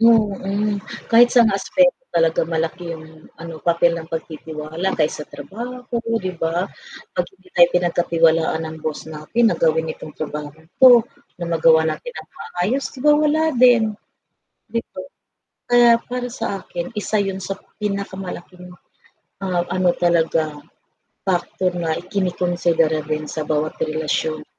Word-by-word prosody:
Mm, 210 -2 +2 0.3
kahit 240 +1 +8
saang 230 -4 +5
aspeto 265 +7 +2 0.2
talaga 165 -1 +3
malaki 165 +1 -2
yung 160 0 -15
ano 165 -1 -9
papel 170 0 +3
ng 160 -1 -7
pagtitiwala 160 +2 -5
kaysa 150 -1 -1
trabaho 240 - -8 0.4
'di 185 -1 -3
ba? 165 +2 0 0.5
Pag 180 - +1
hindi 185 0 -22
tayo 175 -1 +6
pinagkatiwalaan 165 -2 +2
ng 160 0 -6
boss 155 -1 -4
natin 160 +10 -1
na - - -3
gawin 160 0 +1
itong 155 - -11
trabahong 150 0 -6 0.2
'to, 245 -3 +8 0.3
na 175 - -5
magawa 160 -1 +4
natin 160 - -3
ng - - -9
maayos 215 +11 -2
'di 260 - -12
ba 295 - +7
wala 305 +1 +2
din. 240 -3 +5 0.8
'Di 230 0 -1
ba? 185 - -7 0.7
Kaya 240 -1 +7
para 250 0 -4
sa 215 -5 -3
akin, 175 +7 -5
isa 215 - -3
yun 195 -1 -3
sa 195 +1 -4 0.2
pinaka-malaking 190 -3 -5 0.7
mga 185 -2 -1 0.2
ano 185 -1 +2
talaga, 165 -2 +2 0.8
factor 185 0 0
na 160 -1 -1
ikinikonsidera 175 -4 0
din 155 0 -2
sa 155 - -4
bawat 155 0 0
relasyon 155 0 -1
175 Hz, 135 wpm, -21 LUFS, 160-205 Hz, 0.8 s, kahit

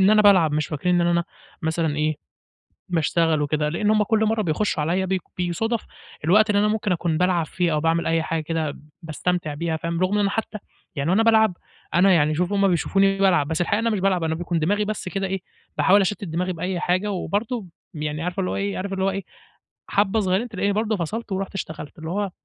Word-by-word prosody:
إن 190 +2 +5
أنا 215 0 +5
بالعب، 185 -7 +5
مش 150 0 0
فاكرين 175 +4 0
إن 170 - +2
أنا 170 0 +2 0.4
مثلًا 160 -2 0
إيه، 155 0 +1 0.8
باشتغل 165 -1 +1
وكده، 150 +1 0
لأن 205 +6 0
هُم 215 -1 +3
كُلّ 220 +1 +2
مَرّة 220 0 +1
بيخشوا 175 -2 0
عليَّ 180 +5 0
بي 190 0 0 0.2
بيصادف 195 +6 -1 0.4
الوقت 210 +6 +5
اللي 205 -1 +3
أنا 210 - +3
ممكن 210 -2 0
أكون 170 -2 0
بالعب 180 -2 +2
فيه 175 +1 -1
أو 150 - +1
باعمل 165 +2 +1
أي 165 0 +1
حاجة 165 0 -2
كده 155 -2 -3 0.2
باستمتع 165 0 -2
بيها، 160 +1 -2
فاهم، 170 +1 -3
رغم 190 +3 +2
إن 200 -1 +2
حتى 220 +1 -3 0.4
يعني 140 +3 -1
وأنا 205 +5 +3
بالعب 220 -4 +4 0.4
أنا 185 +2 +5
يعني 155 -2 +3
شوف 180 +3 0
هُم 200 -1 +3
بيشوفوني 195 +2 +2
بالعب، 180 -7 +3
بس 160 +2 -1
الحقيقة 175 - +1
أنا 230 - +1
مش 210 -4 0
بالعب، 185 -3 +1
أنا 160 0 0
بيكون 170 0 -2
دماغي 205 +6 +1
بس 210 -3 -4
كده 195 0 -2
إيه، 195 +1 -2 0.4
باحاول 200 +2 +5
أشتت 200 +2 -1
دماغي 180 +1 -2
بأي 180 +2 -3
حاجة، 185 +4 0
وبرضه 210 +4 -2 0.3
يعني 150 0 -4
عارفة 180 +2 -3
اللي 185 - -1
هو - - -2
إيه 200 0 -2
عارف 195 +1 -4
اللي 190 0 -1
هو 195 - +3
إيه 195 0 -3 0.7
حبة 205 +2 +2
صغيّرين، 195 +3 0
تلاقيني 200 -1 -1
برضه 215 +1 0
فصلت 210 +6 -4
ورُحت 195 +1 -3
اشتغلت، 160 -4 -6
اللي 160 +1 -6
هو 200 0 -1
180 Hz, 215 wpm, -23 LUFS, 165-200 Hz, 0.8 s, إن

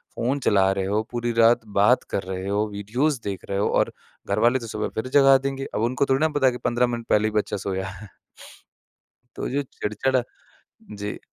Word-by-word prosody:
Phone 130 +5 -1
चला 95 -5 +3
रहे 95 -1 -1
हो 105 +3 0
पूरी 120 0 -2
रात 115 +1 +5 0.2
बात 120 +6 +4
कर 95 - -1
रहे 95 0 -5
हो 105 +2 0
वीडियोज़ 120 +8 -1
देख 100 -2 -5
रहे 100 - -1
हो - - +2
और - - +1 0.4
घरवाले 120 +6 +3
तो 115 - -8
सुबह 110 -1 -3
फिर 110 - -2
जगा 135 -1 +6
देंगे, 135 0 -4
अब 105 - 0
उनको 125 +4 +1
थोड़ी 135 +2 +2
ना 160 - +3
पता 145 -3 0
है - - +4
कि 125 - -6
15 120 +1 +2
मिनट 120 -1 -5
पहले 105 +1 +3
ही - - -2
बच्चा 105 - -3
सोया 95 -1 -3
है। 100 +1 -10 1.3
तो - - -4
जो 140 +2 0
चिड़चड़ 125 +5 0 0.8
जी। 105 +1 -5
115 Hz, 205 wpm, -24 LUFS, 100-130 Hz, 1.3 s, जगा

